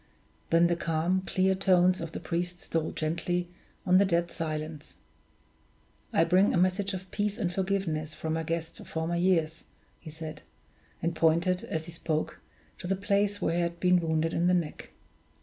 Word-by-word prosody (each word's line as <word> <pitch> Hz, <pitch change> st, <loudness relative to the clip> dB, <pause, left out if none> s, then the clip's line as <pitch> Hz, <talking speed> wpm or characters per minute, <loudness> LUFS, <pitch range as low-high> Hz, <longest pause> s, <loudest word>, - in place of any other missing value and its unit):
Then 165 Hz, +1 st, +5 dB
the 170 Hz, 0 st, +2 dB
calm, 170 Hz, +3 st, 0 dB
clear 190 Hz, 0 st, +2 dB
tones 185 Hz, -1 st, +3 dB
of 165 Hz, -1 st, -5 dB
the -, -, -5 dB
priest 175 Hz, +1 st, -3 dB
stole 165 Hz, -2 st, -2 dB
gently 175 Hz, +2 st, -2 dB, 0.4 s
on 185 Hz, 0 st, +5 dB
the -, -, +6 dB
dead 170 Hz, -2 st, +1 dB
silence. 155 Hz, -1 st, -5 dB, 1.2 s
"I 165 Hz, -, +4 dB
bring 185 Hz, +5 st, +4 dB
a -, -, +3 dB
message 185 Hz, +2 st, +1 dB
of 185 Hz, 0 st, -9 dB
peace 205 Hz, 0 st, -1 dB
and 180 Hz, -6 st, -1 dB
forgiveness 175 Hz, -5 st, -1 dB
from 160 Hz, +1 st, -2 dB
a 160 Hz, -, -1 dB
guest 165 Hz, 0 st, -3 dB
of -, -, -11 dB
former 160 Hz, +1 st, -2 dB
years," 170 Hz, -3 st, +1 dB, 0.3 s
he -, -, -10 dB
said; 155 Hz, 0 st, -7 dB, 0.6 s
and 170 Hz, 0 st, 0 dB
pointed, 170 Hz, +3 st, +2 dB
as 160 Hz, 0 st, -3 dB
he 170 Hz, -, -8 dB
spoke, 160 Hz, -2 st, -2 dB, 0.4 s
to -, -, -6 dB
the 195 Hz, -, +1 dB
place 200 Hz, +1 st, 0 dB
where 165 Hz, -, +1 dB
he -, -, +2 dB
had 170 Hz, 0 st, -2 dB
been 180 Hz, 0 st, +4 dB
wounded 160 Hz, -1 st, 0 dB
in 170 Hz, +1 st, +2 dB
the 180 Hz, -, +4 dB
neck. 165 Hz, -4 st, -3 dB
170 Hz, 180 wpm, -29 LUFS, 160-185 Hz, 1.2 s, the